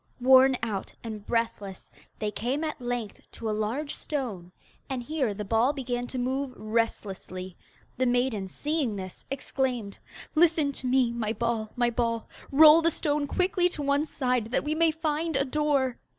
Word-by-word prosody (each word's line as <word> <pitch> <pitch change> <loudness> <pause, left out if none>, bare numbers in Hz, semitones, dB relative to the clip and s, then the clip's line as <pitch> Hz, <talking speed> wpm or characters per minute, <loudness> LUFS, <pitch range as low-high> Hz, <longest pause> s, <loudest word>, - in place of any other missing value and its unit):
Worn 260 +1 +6
out 210 -4 -3
and 215 -3 -6
breathless, 215 -5 -2 0.3
they 210 -1 -2
came 255 +9 -2
at 305 -4 -4
length 240 -3 -4
to 230 - -6
a - - +1
large 225 +8 -2
stone, 220 - -4 0.4
and 260 -2 -3
here 280 -4 -1
the 205 +1 -5
ball 230 +7 +2
began 245 -3 -3
to 260 - -6
move 260 +1 -2
restlessly. 195 -5 -3 0.4
The 255 +1 +2
maiden, 245 -5 +1
seeing 290 - -1
this, 185 -2 -8
exclaimed: 255 -6 -2 0.3
'Listen 320 -3 +3
to 260 -2 -5
me, 250 -2 +3
my 225 -2 -2
ball, 230 -2 -2
my 240 -1 +2
ball. 230 -1 -1 0.2
Roll 310 +3 +8
the 335 - +4
stone 295 -2 -1
quickly 360 +2 +2
to 300 -4 -4
one 285 +2 +1
side, 250 -6 -1
That - - +1
we 300 - -1
may 330 +1 +4
find 315 0 -1
a 270 0 +2
door. 275 -3 +1
250 Hz, 165 wpm, -27 LUFS, 225-290 Hz, 0.4 s, Roll